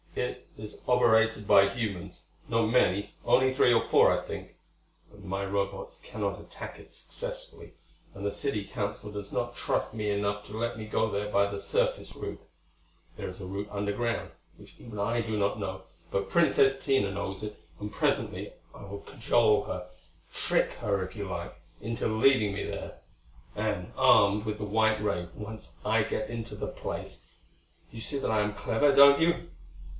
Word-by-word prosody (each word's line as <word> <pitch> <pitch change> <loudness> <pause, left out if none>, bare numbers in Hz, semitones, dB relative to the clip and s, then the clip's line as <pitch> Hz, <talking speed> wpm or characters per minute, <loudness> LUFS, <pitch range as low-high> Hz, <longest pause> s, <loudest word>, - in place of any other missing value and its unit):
It - - -3
is 105 0 -9
operated 110 -3 +4
by 100 -1 +7
humans; 100 -4 -4 0.3
not 115 -1 +3
many; 100 -4 +2
only 130 0 +4
three 125 - +5
or 115 - +3
four, - - +6
I - - 0
think. - - -7 0.5
But 105 -1 -16
my 100 +1 -2
Robots 100 0 -3
cannot - - -3
attack - - -9
it - - -15
successfully, - - -7 0.4
and 100 +1 -7
the 100 - +1
City 105 -7 -2
Council 105 -1 -4
does 105 -1 -6
not - - -2
trust - - -1
me 105 -2 -2
enough 100 0 -1
to 105 - -7
let 115 0 -2
me 110 - -6
go 110 +1 +1
there 105 0 -2
by 100 0 +3
the 100 0 -4
surface - - 0
route. - - -6 0.7
There - - -5
is 90 - -10
a 95 - -6
route 100 +2 -4
underground, 105 +4 -1 0.3
which - - -15
even 110 -3 -8
I 115 +4 +1
do 110 -1 -2
not 100 +1 +1
know; 95 -1 -4 0.3
but 100 0 -2
Princess 135 -5 +4
Tina 135 -8 +2
knows 95 0 -4
it, 105 0 -6 0.2
and 105 0 -6
presently - - 0 0.2
I - - -11
will 100 0 -7
cajole 115 -4 +3
her 90 -1 -5 0.5
trick - - +1
her 100 -2 0
if 95 - -11
you 100 -3 -4
like 85 -1 -4 0.3
into 115 +2 -2
leading 110 -1 +4
me - - -3
there. - - -6 0.6
And, - - -2
armed 100 +1 +5
with 105 -1 -2
the 105 - -4
white 110 +1 +2
ray, 90 -4 -1
once 110 +1 -8
I 110 +1 +3
get 125 +4 -2
into 115 -1 -5
the - - -4
place - - -6 0.6
You 115 - -8
see 140 - -2
that 135 - -1
I 110 -1 +3
am 105 0 -1
clever, 140 +8 +2
don't 140 +1 +8
you?" 170 - +2
105 Hz, 180 wpm, -29 LUFS, 100-115 Hz, 0.7 s, don't